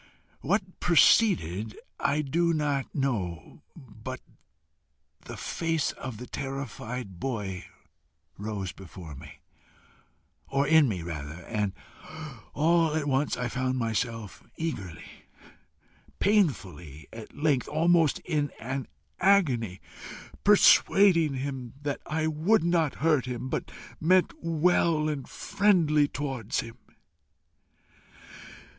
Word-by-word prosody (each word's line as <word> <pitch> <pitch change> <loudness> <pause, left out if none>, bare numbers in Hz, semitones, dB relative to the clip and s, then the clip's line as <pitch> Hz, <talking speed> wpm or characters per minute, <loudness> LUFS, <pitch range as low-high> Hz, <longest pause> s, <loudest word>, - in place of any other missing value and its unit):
What 200 +7 +1 0.2
preceded 145 - +3 0.2
I 145 +2 +1
do 170 +4 +1
not 145 -3 -1
know, 105 - -3
but 130 +1 -9 1.1
the - - -8
face 165 -3 -1
of 130 -5 -7
the 125 - -7
terrified 125 -7 -6
boy 100 -6 -4 0.7
rose 100 -2 -4
before 90 -4 -11
me, 70 +2 -12 1.1
or 140 +1 +1
in 155 -2 +5
me 90 -6 -3
rather, 80 0 -6
and 105 -4 -1 0.8
all 165 +1 +3
at 155 -2 0
once 140 +1 0
I 125 - -1
found 130 +2 -1
myself 115 -2 -2 0.2
eagerly, 100 - -6 0.9
painfully, 95 - 0
at 115 -2 -10
length 145 -4 +1
almost 165 0 +3
in 150 -4 -1
an 130 +3 -4 0.3
agony, 130 - +2 0.6
persuading 190 -6 +5
him 130 -2 -5
that 145 -1 -3
I 155 0 -1
would 160 +6 +2
not 165 -4 +1
hurt 150 -6 +3
him, 125 +1 -4
but 165 +5 -3 0.3
meant 185 +3 +3
well 165 -1 +2
and 145 -4 -4
friendlily 175 -8 +2
towards 135 -7 -3
him. 115 0 -11
135 Hz, 105 wpm, -28 LUFS, 110-160 Hz, 1.1 s, in